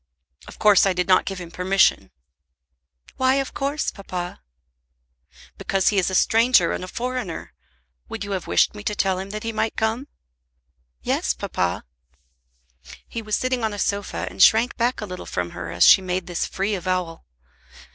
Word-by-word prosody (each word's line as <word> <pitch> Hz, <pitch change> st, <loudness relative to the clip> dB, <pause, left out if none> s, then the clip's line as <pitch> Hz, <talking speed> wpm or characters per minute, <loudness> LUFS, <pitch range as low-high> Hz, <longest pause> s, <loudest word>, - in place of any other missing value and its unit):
"Of -, -, -12 dB
course 210 Hz, -2 st, +5 dB
I 190 Hz, -, +2 dB
did 180 Hz, +1 st, -1 dB
not 185 Hz, -1 st, +4 dB
give 195 Hz, -1 st, -4 dB
him 170 Hz, -2 st, -9 dB
permission." 180 Hz, -, +2 dB, 1.1 s
"Why 260 Hz, 0 st, +3 dB
of 275 Hz, -1 st, -2 dB
course, 280 Hz, +2 st, -2 dB
papa?" 180 Hz, -, -6 dB, 1.2 s
"Because 195 Hz, -1 st, +1 dB
he 205 Hz, -, +2 dB
is 185 Hz, -, 0 dB
a 190 Hz, -, -2 dB
stranger 230 Hz, +6 st, +4 dB
and -, -, -3 dB
a -, -, -6 dB
foreigner. 245 Hz, -4 st, -5 dB, 0.6 s
Would -, -, -5 dB
you 200 Hz, -, -6 dB
have 190 Hz, -3 st, -3 dB
wished -, -, +3 dB
me 210 Hz, -, -9 dB
to 210 Hz, -, -1 dB
tell 190 Hz, -2 st, 0 dB
him 190 Hz, +1 st, -6 dB
that 215 Hz, +1 st, -6 dB
he 230 Hz, -, -2 dB
might 220 Hz, 0 st, -1 dB
come?" 225 Hz, +5 st, -1 dB, 1.0 s
"Yes, -, -, 0 dB
papa." 90 Hz, 0 st, -2 dB, 1.2 s
He 230 Hz, -, -5 dB
was 215 Hz, -1 st, -1 dB
sitting 255 Hz, -2 st, -1 dB
on 220 Hz, -1 st, -1 dB
a -, -, -6 dB
sofa 200 Hz, -, -2 dB
and 90 Hz, +1 st, -5 dB
shrank 225 Hz, +3 st, +5 dB
back 240 Hz, 0 st, 0 dB
a -, -, -3 dB
little 180 Hz, -2 st, -8 dB
from 90 Hz, -1 st, -3 dB
her 85 Hz, -1 st, -7 dB
as 85 Hz, +1 st, +3 dB
she -, -, +8 dB
made 185 Hz, -1 st, -3 dB
this 175 Hz, -1 st, -2 dB
free 195 Hz, +2 st, -2 dB
avowal. 185 Hz, -3 st, -2 dB
195 Hz, 175 wpm, -23 LUFS, 180-225 Hz, 1.2 s, she